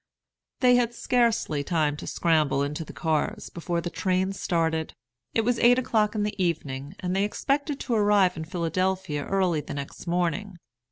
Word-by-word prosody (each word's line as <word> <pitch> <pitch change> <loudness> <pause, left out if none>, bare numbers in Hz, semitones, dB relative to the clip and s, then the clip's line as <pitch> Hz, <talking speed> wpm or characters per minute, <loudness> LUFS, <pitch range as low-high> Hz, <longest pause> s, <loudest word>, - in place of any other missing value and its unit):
They 250 -1 +6
had 240 -1 0
scarcely 230 - +1
time 155 -3 +1
to - - -8
scramble 155 -5 +2
into 150 +3 -3
the - - -10
cars, 160 -2 -2
before 170 0 -2
the 175 - -4
train 185 0 0
started. 160 -4 -1 0.4
It 225 - +4
was 245 0 +1
eight 245 +1 +6
o'clock 220 -4 +1
in 210 - 0
the 205 -2 -1
evening, 145 -2 -3
and 180 -1 -1
they 195 - +2
expected 280 +7 -1
to 245 - -2
arrive 205 -4 +4
in 160 0 -5
Philadelphia 175 -2 -1
early 185 -5 +1
the - - -7
next 140 +5 -7
morning. 180 +3 -1
180 Hz, 170 wpm, -26 LUFS, 160-210 Hz, 0.4 s, They